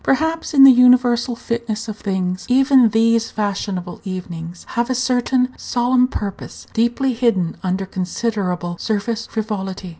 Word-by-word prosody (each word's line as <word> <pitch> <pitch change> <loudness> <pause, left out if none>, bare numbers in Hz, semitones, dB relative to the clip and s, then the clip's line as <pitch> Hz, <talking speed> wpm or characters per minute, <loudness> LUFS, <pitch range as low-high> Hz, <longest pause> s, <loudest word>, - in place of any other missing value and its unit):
Perhaps, 320 +3 0
in 270 - +8
the 270 - +10
universal 250 -1 +4
fitness 230 -1 -4
of 215 - -5
things, 185 -3 -3
even 260 -1 +5
these 225 +1 +2
fashionable 200 -3 -4
evenings 175 -3 -7
have 235 0 -1
a 255 - 0
certain 250 +1 0
solemn 250 +1 +1
purpose, 205 -6 -7
deeply 240 +3 +1
hidden 225 -8 0
under 190 +1 -2
considerable 185 -2 -3
surface 220 +2 -2
frivolity. 195 -4 -4
225 Hz, 130 wpm, -19 LUFS, 190-250 Hz, -, the